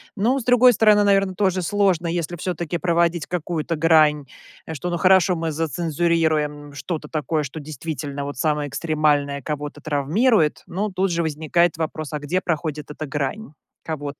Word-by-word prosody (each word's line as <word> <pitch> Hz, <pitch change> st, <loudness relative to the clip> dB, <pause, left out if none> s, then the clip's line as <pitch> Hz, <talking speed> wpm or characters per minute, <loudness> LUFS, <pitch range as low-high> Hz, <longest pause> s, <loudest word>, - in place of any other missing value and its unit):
Ну, 235 Hz, +6 st, +1 dB
с 250 Hz, -, -6 dB
другой 245 Hz, 0 st, +5 dB
стороны, 210 Hz, -1 st, +4 dB
наверно, 195 Hz, -1 st, +2 dB
тоже 190 Hz, -2 st, +1 dB
сложно, 185 Hz, -2 st, +1 dB
если 170 Hz, 0 st, -2 dB
всё-таки 175 Hz, 0 st, -3 dB
проводить 170 Hz, -2 st, +1 dB
какую-то 170 Hz, -1 st, -3 dB
грань 155 Hz, -2 st, +4 dB, 0.5 s
что, 175 Hz, +3 st, -4 dB
ну, 175 Hz, -, -1 dB
хорошо, 185 Hz, +1 st, +4 dB
мы 165 Hz, -1 st, -2 dB
зацензурируем 155 Hz, -1 st, -1 dB
что-то 150 Hz, +1 st, -5 dB
такое, 155 Hz, 0 st, -1 dB
что 140 Hz, +3 st, -7 dB
действительно 145 Hz, -1 st, -5 dB
вот 145 Hz, -2 st, -6 dB
самое 150 Hz, 0 st, 0 dB
экстремальное, 145 Hz, -1 st, 0 dB
кого-то 150 Hz, +1 st, -5 dB
травмирует. 155 Hz, -, +1 dB
Но 205 Hz, +4 st, -2 dB
тут 185 Hz, 0 st, 0 dB
же 170 Hz, -, 0 dB
возникает 160 Hz, +2 st, +1 dB
вопрос: 155 Hz, -2 st, -4 dB
а 150 Hz, -, -2 dB
где 160 Hz, +6 st, -1 dB
проходит 155 Hz, -3 st, -3 dB
эта 155 Hz, +1 st, -6 dB
грань 145 Hz, +7 st, -4 dB, 0.3 s
кого-то? 145 Hz, -3 st, -5 dB
160 Hz, 155 wpm, -22 LUFS, 150-180 Hz, 0.5 s, другой